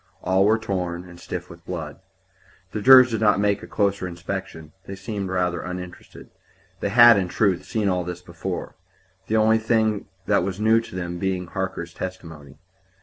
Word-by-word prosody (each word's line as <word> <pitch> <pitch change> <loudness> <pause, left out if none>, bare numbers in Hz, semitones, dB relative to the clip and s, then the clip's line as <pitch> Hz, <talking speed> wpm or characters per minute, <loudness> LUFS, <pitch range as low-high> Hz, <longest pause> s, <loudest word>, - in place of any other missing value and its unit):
All 95 +1 +3
were 110 +2 +4
torn, 90 -5 -4
and 85 -1 -13
stiff 90 0 -6
with 85 -1 -14
blood. 80 -5 -6 0.7
The 105 - -4
jurors 130 +1 +8
did 110 -1 -2
not 105 -2 +4
make 100 0 +1
a - - -10
closer 100 -3 0
inspection. 90 -3 -6 0.2
They 95 - -6
seemed 100 0 -5
rather 90 -2 -1
uninterested. 90 0 -9 0.5
They - - -1
had, 120 +1 +8
in 95 -2 0
truth, 95 0 0
seen 110 -2 -1
all 90 -2 0
this 90 0 -7
before; 90 +1 -6 0.5
the 110 - +1
only 110 +1 +4
thing 110 -2 0 0.2
that 100 -1 +2
was 95 +1 -4
new 110 +1 +4
to 115 - -11
them 85 -1 -4
being 95 -1 -2
Harker's 95 -2 -5
testimony. 80 -7 -8
95 Hz, 175 wpm, -23 LUFS, 90-105 Hz, 0.7 s, jurors